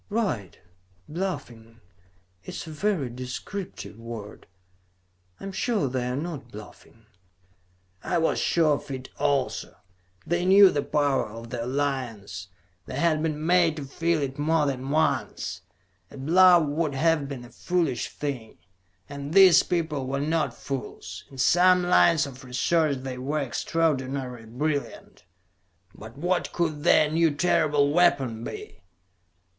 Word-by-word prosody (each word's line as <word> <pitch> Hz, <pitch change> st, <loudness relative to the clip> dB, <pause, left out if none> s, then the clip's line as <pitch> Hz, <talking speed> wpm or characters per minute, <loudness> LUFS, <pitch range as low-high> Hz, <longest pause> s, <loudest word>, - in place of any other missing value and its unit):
"Right! 190 Hz, -, -2 dB, 0.5 s
Bluffing. 120 Hz, -10 st, -5 dB, 0.6 s
It -, -, -8 dB
is -, -, -6 dB
a 160 Hz, -, -8 dB
very 165 Hz, -3 st, -1 dB
descriptive 125 Hz, -, -7 dB
word. 115 Hz, -3 st, -9 dB, 0.9 s
I -, -, -12 dB
am 195 Hz, -, -5 dB
sure 205 Hz, -, 0 dB
they 125 Hz, -1 st, -2 dB
are 125 Hz, -, -2 dB
not 145 Hz, -5 st, -5 dB
bluffing." 105 Hz, +1 st, -13 dB, 1.0 s
I 175 Hz, -, 0 dB
was 165 Hz, -1 st, +1 dB
sure 160 Hz, -3 st, +3 dB
of -, -, -13 dB
it 130 Hz, -1 st, -6 dB
also. 140 Hz, -3 st, -1 dB, 0.5 s
They 175 Hz, +1 st, 0 dB
knew 195 Hz, +1 st, +7 dB
the 145 Hz, -, 0 dB
power 140 Hz, -6 st, 0 dB
of 115 Hz, +2 st, -10 dB
the 120 Hz, -2 st, -3 dB
Alliance; 120 Hz, -9 st, -3 dB, 0.4 s
they -, -, -6 dB
had 155 Hz, +1 st, +2 dB
been 155 Hz, -1 st, -2 dB
made 175 Hz, -2 st, +4 dB
to 145 Hz, -3 st, -6 dB
feel 165 Hz, +2 st, 0 dB
it 135 Hz, +1 st, -5 dB
more 155 Hz, +1 st, +2 dB
than 135 Hz, -1 st, -3 dB
once. 140 Hz, -, -1 dB, 0.5 s
A -, -, -12 dB
bluff 175 Hz, +5 st, +6 dB
would 150 Hz, 0 st, -1 dB
have 155 Hz, 0 st, +2 dB
been 130 Hz, -3 st, -7 dB
a 120 Hz, -, -15 dB
foolish 165 Hz, -9 st, -1 dB
thing, 135 Hz, -7 st, -5 dB, 0.5 s
and 140 Hz, +2 st, -6 dB
these 190 Hz, -4 st, +8 dB
people 160 Hz, -6 st, -2 dB
were 140 Hz, +1 st, -2 dB
not 155 Hz, +2 st, 0 dB
fools. 135 Hz, -2 st, -6 dB
In 135 Hz, -, -13 dB
some 180 Hz, +6 st, +4 dB
lines 170 Hz, -3 st, +4 dB
of 130 Hz, -1 st, -10 dB
research 140 Hz, +4 st, +1 dB
they 130 Hz, -1 st, -5 dB
were 145 Hz, +4 st, -1 dB
extraordinarily 130 Hz, -4 st, -2 dB
brilliant. 140 Hz, +1 st, -4 dB, 0.7 s
But 110 Hz, +4 st, -12 dB
what 175 Hz, +4 st, -1 dB
could 155 Hz, -4 st, -2 dB
their 155 Hz, -3 st, +5 dB
new, 165 Hz, +1 st, +3 dB
terrible 150 Hz, -3 st, +2 dB
weapon 135 Hz, -10 st, +2 dB
be? -, -, -8 dB
145 Hz, 140 wpm, -26 LUFS, 130-165 Hz, 1.0 s, these